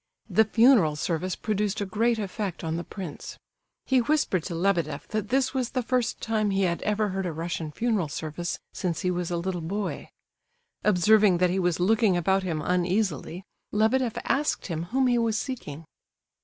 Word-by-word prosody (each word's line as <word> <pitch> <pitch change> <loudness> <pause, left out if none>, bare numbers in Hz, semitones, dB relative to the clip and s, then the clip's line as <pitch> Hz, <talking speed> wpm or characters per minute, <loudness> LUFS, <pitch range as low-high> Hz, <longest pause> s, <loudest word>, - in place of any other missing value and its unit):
The 220 - +4
funeral 225 - +5
service 170 +4 -2
produced 210 -1 -1
a 205 - -1
great 225 +4 +1
effect 200 -3 -4
on 160 0 -2
the 170 - -3
prince. 180 -4 -8 0.5
He 260 -2 +3
whispered 240 - +1
to 170 - -4
Lebedeff 165 -5 0
that 215 -1 -2
this 265 +1 +1
was 255 -3 -1
the 255 -2 -2
first 250 0 0
time 215 -2 0
he 195 0 +1
had 170 -2 0
ever 210 0 0
heard 190 -1 -2
a - - -2
Russian 165 -1 -4
funeral 215 -2 0
service 155 +4 -4 0.2
since 170 -4 -2
he 180 - +1
was 180 -1 -2
a 175 - -1
little 175 0 -3
boy. 200 +5 -4 0.7
Observing 210 0 +5
that 180 0 +2
he 190 - 0
was 175 -2 +1
looking 205 0 +3
about 190 +3 +2
him 165 -5 -3
uneasily, 180 -1 -1 0.3
Lebedeff 225 +3 +1
asked 295 +2 0
him 165 -2 -3
whom 260 +8 +1
he 245 -1 +3
was 225 -2 +1
seeking. 165 - -5
195 Hz, 180 wpm, -26 LUFS, 175-220 Hz, 0.7 s, funeral